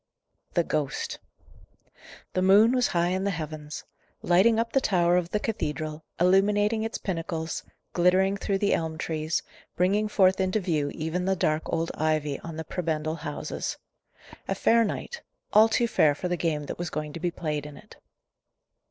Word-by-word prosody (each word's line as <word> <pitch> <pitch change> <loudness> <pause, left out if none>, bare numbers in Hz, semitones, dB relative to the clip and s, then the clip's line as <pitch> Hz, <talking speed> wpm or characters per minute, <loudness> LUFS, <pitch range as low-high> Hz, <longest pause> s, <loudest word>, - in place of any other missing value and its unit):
THE 170 - +4
GHOST. 150 -4 -2 1.1
The 185 - +1
moon 200 +5 +6
was 250 -1 +2
high 175 -1 +1
in 185 +1 -1
the 200 - +1
heavens. 155 -3 -5 0.4
Lighting 195 +6 +4
up 230 0 -1
the 270 - +3
tower 175 -6 +3
of 180 -1 +1
the 210 - 0
cathedral, 155 -7 -3 0.2
illuminating 205 +4 +3
its 225 +1 -3
pinnacles, 165 -3 -3 0.3
glittering 185 +2 +3
through 200 0 -1
the 200 +1 +1
elm 160 -1 -1
trees, 155 0 -2 0.3
bringing 200 +4 +2
forth 190 -2 +3
into 190 +3 +1
view 160 -7 0
even 160 +4 -2
the 190 0 +2
dark 155 -2 0
old 165 0 -1
ivy 155 -2 0
on 165 -1 -8
the 160 - -3
prebendal 160 -2 -2
houses. 160 - -4 0.7
A - - -1
fair 230 0 +4
night 475 - -4 0.3
all 220 +2 +7
too 235 +2 +2
fair 155 -10 +3
for 180 - -3
the 180 - 0
game 160 -3 -1
that - - -6
was 175 -1 -3
going 150 -1 -4
to 170 - -6
be 175 +1 0
played 150 -4 -3
in 150 - -11
it. 215 - -15
175 Hz, 170 wpm, -27 LUFS, 155-200 Hz, 1.1 s, all